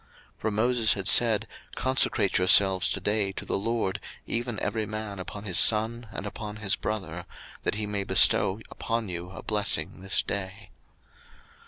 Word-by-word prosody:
02:032:029 - - -39
For 110 - -1
Moses 115 +1 +2
had 100 -2 -4
said, 115 -2 +5 0.3
Consecrate 130 -7 +1
yourselves 95 0 +5
today 105 -1 -1
to - - -7
the - - -2
LORD, 110 -2 -2 0.3
even 120 -2 -3
every 110 -2 -3
man 110 -2 -6
upon 100 +2 -8
his 95 -5 +3
son, 115 +2 +3
and 100 - -7
upon 105 0 -7
his 105 -2 0
brother; 90 -5 -5 0.4
that - - -2
he 105 0 -3
may 105 -1 -3
bestow 95 +1 +4
upon 115 -2 -3
you 90 0 -6
a 95 - -10
blessing 95 -4 -1
this 95 - -1
day. 100 0 -6
105 Hz, 160 wpm, -26 LUFS, 95-110 Hz, 0.4 s, said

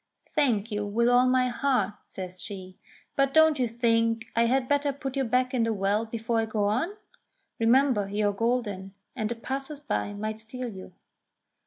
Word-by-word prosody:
"Thank 235 -8 +1
you 210 0 -1
with 220 +4 +1
all 245 +1 +5
my 255 0 +3
heart," 245 -6 +1
says 185 -1 -7
she; 190 -3 -7 0.4
"but 275 +1 +1
don't 315 -2 +6
you 250 - +2
think 230 -1 +1
I 230 0 +4
had 255 +1 +1
better 285 0 +2
put 270 -1 -6
you 270 - +1
back 255 +1 +1
in 250 - +1
the 225 0 +1
well 205 +2 0
before 230 +1 -1
I 225 - 0
go 215 -1 -1
on? 255 - 0 0.6
Remember 230 -3 +3
you 205 +1 +1
are - - -2
golden, 205 -4 -2 0.2
and 215 -4 -2
the 235 - -2
passers 270 +5 -5
by 245 -7 -2
might 215 +1 -4
steal 245 +3 -6
you." 190 -3 -10
230 Hz, 185 wpm, -27 LUFS, 210-255 Hz, 0.6 s, don't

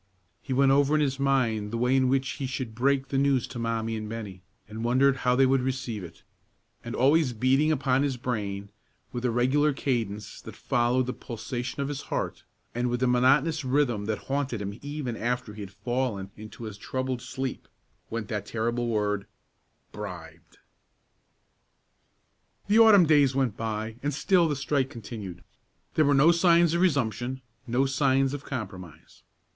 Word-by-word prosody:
He 135 - -8
went 135 +1 +4
over 140 +2 +3
in 155 - +3
his 135 -2 0
mind 125 -6 +1
the 115 - -3
way 125 +2 +2
in 130 -1 +3
which 135 0 +1
he 135 0 -4
should 130 -3 -4
break 135 +3 +1
the 135 - +1
news 135 -3 +2
to 125 - -8
Mommie 115 -1 -1
and 110 -1 -5
Bennie, 105 -5 -7 0.3
and 110 +2 -6
wondered 130 +3 +3
how 125 0 +2
they 135 +1 +5
would 130 0 +3
receive 130 -5 -3
it; 85 -1 -12 0.6
and - - -5
always 140 0 +3
beating 135 +7 +2
upon 135 -3 +1
his 140 -3 0
brain, 100 -5 -3 0.4
with 120 - -5
a - - +3
regular 130 +5 +2
cadence 110 -7 -3
that - - -10
followed 120 +2 +1
the 125 - -3
pulsation 125 +3 -5
of - - -3
his 145 -1 -4
heart, - - -3 0.3
and 120 +1 -1
with 120 +1 -1
a - - +3
monotonous 135 +5 +3
rhythm 130 -6 +1
that 110 0 -1
haunted 135 -4 -2
him 100 +2 -5
even 145 -4 -4
after 120 -1 -2
he 105 - -9
had 100 - -7
fallen 100 -1 -3
into 110 +2 -10
a 110 - -6
troubled 130 +4 -3
sleep, 130 +1 -5 0.4
went 115 -2 -4
that 105 -2 -4
terrible 120 +1 -1
word, 105 -3 -1 0.6
Bribed! 85 -6 -9 2.1
The 210 +2 +4
autumn 215 -5 +8
days 145 -4 +4
went 130 -6 +1
by, 110 0 -4
and 145 0 -2
still 170 +3 +3
the 150 - -1
strike 135 -1 0
continued. 110 -7 -8 0.5
There 155 - +3
were 140 0 +4
no 150 +5 +6
signs 170 -1 +4
of 170 - +1
resumption, 130 - 0 0.2
no 125 +3 +2
signs 135 0 +2
of 145 -1 -5
compromise. 95 - -8
125 Hz, 175 wpm, -27 LUFS, 110-135 Hz, 2.1 s, autumn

